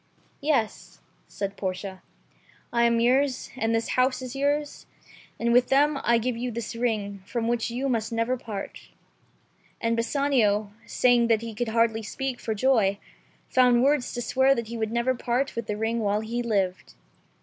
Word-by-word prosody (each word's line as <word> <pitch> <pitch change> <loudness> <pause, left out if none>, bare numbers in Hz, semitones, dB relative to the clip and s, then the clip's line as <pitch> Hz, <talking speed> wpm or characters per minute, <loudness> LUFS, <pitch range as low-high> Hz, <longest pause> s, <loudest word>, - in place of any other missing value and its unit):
^'Yes," 280 -7 -1 0.3
said 200 -1 -5
Portia, 190 0 -5 0.7
"I 235 0 +3
am 235 0 +3
yours, 255 +2 +1
and 230 -3 0
this 225 0 -1
house 255 +1 +1
is 255 +1 -6
yours, 290 +2 -1 0.5
and 235 0 +1
with 245 0 +5
them 285 +1 +3
I 235 0 +4
give 240 +1 -1
you 245 +2 -3
this 230 -1 -5
ring, 210 -4 -2
from 235 -2 -2
which 235 -1 0
you 250 +4 -2
must 230 -4 -1
never 230 +2 0
part." 215 -5 -7 0.9
And 230 0 0
Bassanio, 230 -5 +1 0.2
saying 245 -2 +3
that 225 -2 +3
he 230 -1 -6
could 240 +3 -2
hardly 225 0 +2
speak 260 +4 -4
for 220 - -3
joy, 210 -4 +2 0.5
found 250 -1 +4
words 280 -2 +2
to 240 - -2
swear 265 +3 +3
that 235 -3 -4
he 235 - -5
would 220 -1 -2
never 235 +2 +1
part 250 +2 -1
with 230 -2 -4
the 210 -1 -2
ring 225 +2 -1
while 210 -1 0
he 235 +2 -3
lived. 195 -6 -1
235 Hz, 170 wpm, -26 LUFS, 220-255 Hz, 0.9 s, with